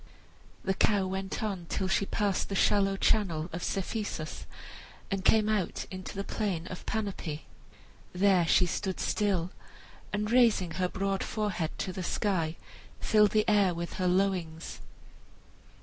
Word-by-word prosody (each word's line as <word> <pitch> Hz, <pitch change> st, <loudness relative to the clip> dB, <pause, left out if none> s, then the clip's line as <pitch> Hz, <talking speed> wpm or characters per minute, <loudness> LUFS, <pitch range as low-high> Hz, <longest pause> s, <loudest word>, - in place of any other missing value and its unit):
The 190 Hz, -, +1 dB
cow 200 Hz, 0 st, +2 dB
went 190 Hz, +2 st, -3 dB
on 190 Hz, -5 st, -3 dB
till 190 Hz, -, -1 dB
she 190 Hz, +1 st, +1 dB
passed 200 Hz, -2 st, 0 dB
the 200 Hz, -, -2 dB
shallow 195 Hz, 0 st, +3 dB
channel 170 Hz, -6 st, +1 dB
of 170 Hz, -, -4 dB
Cephisus 195 Hz, -5 st, -3 dB, 0.6 s
and 195 Hz, -1 st, -1 dB
came 215 Hz, +2 st, +4 dB
out 210 Hz, -4 st, -1 dB
into 185 Hz, +1 st, -7 dB
the 200 Hz, -, -2 dB
plain 195 Hz, -6 st, -2 dB
of 185 Hz, -, -7 dB
Panope. 195 Hz, -8 st, -3 dB, 0.7 s
There 185 Hz, -2 st, +3 dB
she 180 Hz, -, +5 dB
stood 190 Hz, +1 st, -2 dB
still, 190 Hz, -5 st, 0 dB, 0.6 s
and 210 Hz, +1 st, -1 dB
raising 230 Hz, -8 st, +4 dB
her 180 Hz, +2 st, -1 dB
broad 195 Hz, +1 st, -1 dB
forehead 205 Hz, -7 st, -2 dB
to 185 Hz, -, -3 dB
the 185 Hz, -, -4 dB
sky, 170 Hz, -3 st, 0 dB, 0.4 s
filled 210 Hz, -1 st, +4 dB
the 215 Hz, +1 st, +2 dB
air 200 Hz, -4 st, +4 dB
with 170 Hz, 0 st, -4 dB
her 180 Hz, -, +2 dB
lowings. 180 Hz, -3 st, 0 dB
190 Hz, 145 wpm, -30 LUFS, 180-205 Hz, 0.7 s, she